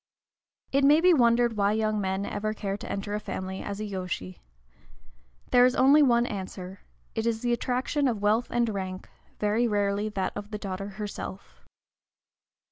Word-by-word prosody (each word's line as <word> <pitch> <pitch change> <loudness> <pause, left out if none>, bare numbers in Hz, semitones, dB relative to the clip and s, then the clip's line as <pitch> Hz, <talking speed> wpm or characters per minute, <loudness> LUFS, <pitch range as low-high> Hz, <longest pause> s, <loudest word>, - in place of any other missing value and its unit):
It 275 +1 +2
may 290 +3 +6
be 360 +1 +5
wondered 235 -4 +3
why 200 0 +2
young 215 -1 0
men 190 +1 -1
ever 215 +1 -3
care 195 -2 -3
to 205 - -7
enter 200 +1 -4
a 210 - -1
family 190 -2 -5
as 200 0 -5
yōshi. 180 - -5 1.1
There 245 0 +6
is 250 +1 +4
only 275 +4 +6
one 240 -4 +4
answer, 190 -2 -6 0.3
it 225 0 -1
is 225 -1 0
the 240 -1 +2
attraction 255 +4 0
of 230 -5 -1
wealth 220 +4 +2
and 240 -1 +1
rank, 190 -2 -5 0.3
very 215 +3 +2
rarely 205 0 0
that 195 -3 -2
of 205 0 -6
the 215 - -4
daughter 195 -1 -5
herself. 205 -2 -7
210 Hz, 165 wpm, -27 LUFS, 200-240 Hz, 1.1 s, may